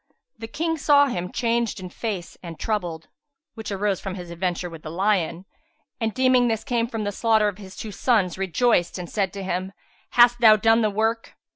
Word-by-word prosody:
The 225 - -6
King 325 +6 -2
saw 285 0 +5
him 180 -9 -3
changed 235 -3 -1
in 185 -1 -7
face 200 -6 -5
and 170 -3 -9
troubled 175 -7 -3 0.5
(which 220 -2 -7
arose 200 -1 -1
from 195 -2 -5
his 175 -2 -8
adventure 180 +1 -2
with 165 -2 -10
the 155 - -8
lion) 185 0 0 0.5
and, 225 -2 -1
deeming 255 0 +3
this 225 -2 -1
came 235 -1 -1
of 225 -2 -3
the 205 - -2
slaughter 220 0 +2
of 205 -1 -4
his 190 -2 -11
two 215 - -7
sons, 205 -5 +1
rejoiced 190 0 +1
and 180 -1 -6
said 195 -1 -1
to 200 -1 -6
him, 185 +1 -3 0.4
"Hast 240 0 +6
thou 220 -2 +8
done 225 +2 +3
the 215 - +2
work?" 225 +2 -1
210 Hz, 195 wpm, -24 LUFS, 185-230 Hz, 0.5 s, thou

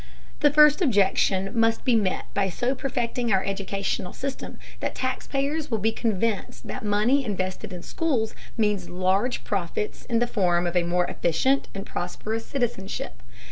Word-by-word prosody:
The 290 - +5
first 300 +2 +6
objection 195 - +3
must 225 -1 +2
be 250 - +4
met 200 -4 +1
by 195 -1 +1
so 245 +8 0
perfecting 245 -3 -1
our 190 -1 +3
educational 195 -2 -2
system 275 0 -5 0.2
that - - -3
taxpayers 275 +4 -2
will 225 - +1
be 220 +2 +1
convinced 220 -1 -1
that - - -6
money 215 +7 +3
invested 195 -2 -3
in 180 -1 -7
schools 260 -10 -1 0.2
means 205 -5 +1
large 185 +7 +1
profits 200 +1 -3
in 235 - +1
the 240 - +3
form 180 -6 +1
of 175 +1 -2
a 175 - +5
more 175 +1 +1
efficient 260 +15 +1
and 195 - -5
prosperous 220 +5 -4
citizenship. 195 - -3
215 Hz, 155 wpm, -25 LUFS, 190-250 Hz, 0.2 s, first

